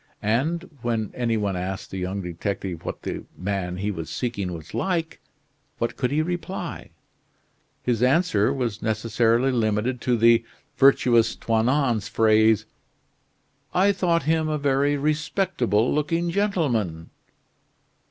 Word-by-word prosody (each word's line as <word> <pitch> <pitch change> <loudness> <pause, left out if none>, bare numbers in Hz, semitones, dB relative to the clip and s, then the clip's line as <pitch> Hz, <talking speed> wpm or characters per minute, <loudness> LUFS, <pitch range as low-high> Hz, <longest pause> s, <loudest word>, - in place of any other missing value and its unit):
And 150 - 0
when 115 -3 -1
any 115 -2 0
one 100 -3 -1
asked 95 +1 -4
the 95 - -4
young 95 +2 -3
detective 90 0 -4
what - - -6
the - - -4
man 90 -2 -3
he 100 +2 -1
was 80 -5 -6
seeking 100 -7 -3
was 80 -2 -9
like, 170 -4 -1 0.6
what 115 - -2
could 125 - 0
he 150 +2 +1
reply? 175 +3 -5 0.9
His 120 -2 0
answer 130 - +3
was 120 -6 -2
necessarily 115 +3 +1
limited 115 +1 0
to 125 -2 +1
the 115 0 +5 0.3
virtuous 120 -4 +4
Toinon's 115 -1 +1
phrase: 110 0 +3 1.1
"I 195 +3 +5
thought 175 -4 +1
him 160 +1 +1
a 155 - 0
very 140 0 +1
respectable 150 - 0
looking 165 +3 0
gentleman." 130 - -1
115 Hz, 125 wpm, -24 LUFS, 105-150 Hz, 1.1 s, the